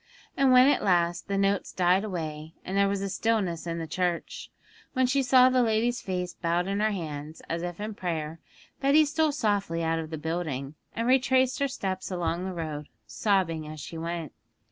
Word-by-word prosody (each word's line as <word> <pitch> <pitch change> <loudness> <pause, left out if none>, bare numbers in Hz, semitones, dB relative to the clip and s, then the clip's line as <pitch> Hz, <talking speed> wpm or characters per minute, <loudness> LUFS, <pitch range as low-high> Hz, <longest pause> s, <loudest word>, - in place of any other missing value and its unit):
And 270 -1 +4
when 255 +1 +8
at 290 - +3
last 175 -3 +1
the 200 - -1
notes 195 0 +1
died 185 +2 +3
away, 160 -5 -5
and 190 - -4
there 200 0 +4
was 195 -1 -2
stillness 190 -8 0
in 170 0 -2
the 165 - -3
church, 175 +2 -2 0.4
when 260 -1 +3
she 270 +2 +2
saw 255 0 +6
the 255 0 +3
lady's 235 +2 +1
face 180 -2 -3
bowed 170 +1 -1
in 200 +1 -1
her 215 +1 +3
hands, 155 -5 -5
as 165 +1 -2
if 175 0 -5
in 215 +1 -4
prayer, 165 -4 -4 0.4
Betty 280 +3 +5
stole 310 +1 +1
softly 200 - 0
out 165 0 +1
of 160 -1 -5
the 160 - -4
building, 155 -4 -3 0.2
and 230 +1 -1
retraced 260 0 +3
her 280 - +2
steps 190 -8 -4
along 175 -1 -2
the 190 - -3
road, 155 -3 -5 0.2
sobbing 165 - 0
as 155 0 -8
she 150 - -8
went. 165 -1 -4
185 Hz, 190 wpm, -27 LUFS, 165-225 Hz, 0.4 s, when